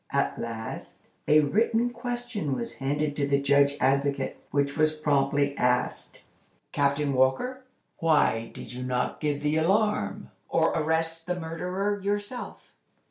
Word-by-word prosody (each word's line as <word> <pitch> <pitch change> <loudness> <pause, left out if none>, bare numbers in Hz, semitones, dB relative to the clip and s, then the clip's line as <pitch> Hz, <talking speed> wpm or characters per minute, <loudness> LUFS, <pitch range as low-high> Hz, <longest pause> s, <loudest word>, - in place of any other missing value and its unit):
At - - 0
last, 110 -1 -6 0.2
a 155 +1 +6
written 225 +9 +2
question 240 - -3
was 235 - -5
handed 145 +2 -1
to 140 -1 +1
the 140 0 +2
Judge 140 0 +3
Advocate, 140 0 +1
which 140 0 0
was 155 0 +2
promptly 140 -1 +1
asked: 125 0 -1 0.5
"Captain 140 0 +1
Walker, 135 - +1 0.3
why 150 -8 +2
did - - -9
you 125 - -6
not 125 -1 -1
give 145 -1 -1
the 150 +1 +2
alarm, 180 - +1 0.2
or 165 0 +3
arrest 165 +1 -1
the 180 0 -1
murderer 180 +5 -2
yourself?" 205 +5 -4
150 Hz, 135 wpm, -27 LUFS, 140-185 Hz, 0.5 s, a